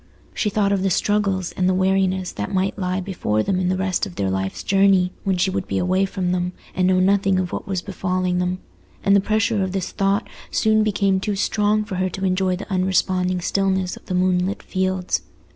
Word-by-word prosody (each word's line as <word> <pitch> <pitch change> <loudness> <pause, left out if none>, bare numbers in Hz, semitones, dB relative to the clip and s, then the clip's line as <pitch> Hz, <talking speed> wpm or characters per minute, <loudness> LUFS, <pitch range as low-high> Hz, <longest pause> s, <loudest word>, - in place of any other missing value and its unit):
She 210 - 0
thought 200 -1 +1
of 200 -2 +1
the 195 - +1
struggles 195 -1 0
and 185 0 0
the 185 - +2
weariness 190 0 +1
that - - -5
might 190 +1 -1
lie 185 0 -1
before 140 - -1
them 190 -2 0
in 180 -1 0
the 185 - 0
rest 190 +2 0
of 180 - -11
their 95 -1 -1
life's 95 0 -3
journey, 195 -2 +3
when 190 -2 0
she 190 +2 +1
would 190 -1 -3
be - - -2
away 185 +2 +2
from 185 -2 -2
them, 180 0 -1 0.2
and 185 0 +1
know 185 0 +3
nothing 195 0 +3
of 185 -1 -1
what - - -5
was 190 -2 -2
befalling 185 -2 -1
them; 180 0 -1 0.5
and 200 - +4
the 200 - +5
pressure 215 +1 +1
of 190 -1 -2
this 190 -2 -2
thought 200 +3 0 0.2
soon 215 -1 +2
became 200 -2 +1
too 205 +1 -2
strong 210 +2 +1
for 190 -3 -5
her 185 0 0
to 190 +1 -4
enjoy 185 0 +1
the 190 - -7
unresponding 185 -1 +1
stillness 190 0 0
of - - -16
the 185 - -2
moonlit 185 +1 +1
fields. 185 -1 -1
190 Hz, 215 wpm, -22 LUFS, 185-195 Hz, 0.5 s, the